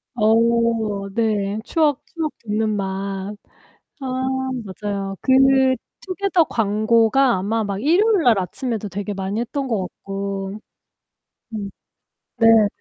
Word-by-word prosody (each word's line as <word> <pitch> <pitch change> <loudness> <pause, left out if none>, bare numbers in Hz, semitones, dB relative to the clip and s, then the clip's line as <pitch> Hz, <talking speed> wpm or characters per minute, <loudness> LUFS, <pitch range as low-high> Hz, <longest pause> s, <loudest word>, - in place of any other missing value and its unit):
어 220 -1 +3 0.8
네 215 -2 0
추억, 300 -4 +1
추억 320 -3 -4
돋는 215 +1 0
맛. 195 +1 -4 0.7
아 - - -5 0.6
맞아요. 195 0 -4
그 260 - 0 0.7
투게더 375 -3 +1
광고가 225 +4 +2
아마 215 +4 -1
막 200 0 -3
일요일날 335 - +4
아침에도 220 +3 -3
되게 205 +2 -4
많이 195 +3 -3
했던 270 +3 -3
것 220 -5 0
같고. 195 +2 -5 0.9
음. 200 -2 -4 0.7
네네. 225 -2 +6
215 Hz, 200 characters per minute, -21 LUFS, 200-250 Hz, 0.9 s, 네네